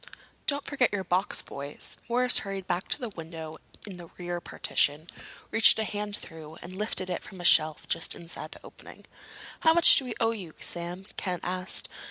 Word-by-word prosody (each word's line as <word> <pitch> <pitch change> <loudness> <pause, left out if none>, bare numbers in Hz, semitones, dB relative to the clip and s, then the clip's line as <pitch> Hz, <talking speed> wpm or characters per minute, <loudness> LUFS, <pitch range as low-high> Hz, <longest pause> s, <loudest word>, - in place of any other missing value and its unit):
"Don't 285 -1 +1
forget 270 -4 +2
your 200 -2 -1
box, 185 +2 0
boys." 140 +1 -5
Morris 250 +1 +4
hurried 195 -2 -5
back 175 +1 -1
to - - +1
the 245 -4 -4
window 160 -3 -8 0.3
in 195 -3 -8
the 175 -1 -10
rear 175 -1 -3
partition, 150 0 +1 0.4
reached 225 0 +7
a 220 - +1
hand 210 -1 -3
through, 160 -1 -10
and 185 +2 -8
lifted 200 -2 0
it 180 - -2
from 190 - -12
a 175 - -6
shelf 155 -2 +5
just - - -1
inside 170 0 -7
the - - -15
opening. - - -13 0.5
"How 320 0 +5
much 340 - +8
do 270 - +1
we 245 - -4
owe 225 -1 +3
you, 190 -8 -7
Sam?" 175 +2 -3
Ken 180 -2 -2
asked. 185 +1 0
185 Hz, 190 wpm, -28 LUFS, 170-215 Hz, 0.5 s, much